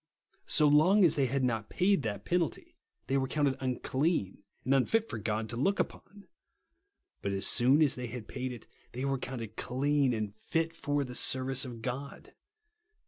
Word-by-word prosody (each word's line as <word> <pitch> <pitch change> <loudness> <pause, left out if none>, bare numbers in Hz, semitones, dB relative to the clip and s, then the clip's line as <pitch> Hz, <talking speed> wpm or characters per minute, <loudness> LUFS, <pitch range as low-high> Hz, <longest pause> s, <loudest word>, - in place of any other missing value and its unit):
So 150 - +4
long 180 +7 +5
as 160 - +4
they 140 -2 +1
had 135 +2 -1
not 115 -4 -1
paid 195 -2 +2
that 105 -4 -4
j^enalty, 175 -3 -1 0.3
tliey 135 +1 +2
were 130 - -1
counted 140 -1 0
ini 130 -2 -2
cleaii 130 - -1 0.2
and 130 - +2
unfit 220 - +2
for 110 - -5
God 110 +1 -2
to 115 - -5
look 195 +12 +1
upon; 205 0 -5 0.9
but 100 - -2
as 95 +1 -2
soon 135 +6 +4
as 145 - +3
they 125 -1 -4
had 115 -1 -7
paid 130 0 -4
it, 120 -3 -9 0.3
they 130 +3 -3
were 135 -1 0
counted 115 -5 -6
clean 135 +2 +1
and 110 -3 -2
ht 165 +9 -2
for 145 -3 -1
the 125 -2 -7
service 130 +2 +1
of 120 -3 -8
God. 135 +3 -6
130 Hz, 185 wpm, -31 LUFS, 120-145 Hz, 0.9 s, long